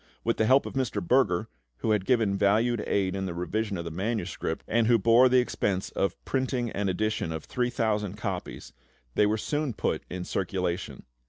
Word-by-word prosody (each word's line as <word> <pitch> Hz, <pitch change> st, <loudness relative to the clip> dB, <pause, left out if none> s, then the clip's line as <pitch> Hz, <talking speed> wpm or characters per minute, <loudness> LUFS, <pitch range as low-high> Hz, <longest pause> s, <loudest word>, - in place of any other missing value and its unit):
With 115 Hz, -, 0 dB
the 110 Hz, -, +2 dB
help 135 Hz, +3 st, +5 dB
of -, -, -6 dB
Mr. 130 Hz, -6 st, -1 dB
Berger, 110 Hz, -1 st, +2 dB, 0.3 s
who 110 Hz, -, -1 dB
had 105 Hz, -3 st, +1 dB
given 110 Hz, -6 st, +2 dB
valued 105 Hz, +3 st, +2 dB
aid 95 Hz, -2 st, +1 dB
in 95 Hz, -1 st, -2 dB
the 85 Hz, -, -5 dB
revision 100 Hz, +3 st, -2 dB
of 85 Hz, -, -5 dB
the 85 Hz, -, -4 dB
manuscript, 95 Hz, -3 st, -3 dB
and 115 Hz, 0 st, +2 dB
who 120 Hz, -1 st, +5 dB
bore 115 Hz, +4 st, +5 dB
the 130 Hz, -, +4 dB
expense 100 Hz, -6 st, 0 dB
of 95 Hz, -2 st, -1 dB
printing 130 Hz, -3 st, -1 dB
an 100 Hz, -1 st, -1 dB
edition 110 Hz, -2 st, -1 dB
of 80 Hz, -1 st, -4 dB
3000 110 Hz, -5 st, -1 dB
copies, 95 Hz, -3 st, -5 dB, 0.4 s
they 105 Hz, -, +4 dB
were 110 Hz, +1 st, +1 dB
soon 145 Hz, +3 st, -2 dB
put -, -, -1 dB
in 90 Hz, 0 st, -4 dB
circulation. 90 Hz, -2 st, -2 dB
105 Hz, 185 wpm, -27 LUFS, 95-120 Hz, 0.4 s, help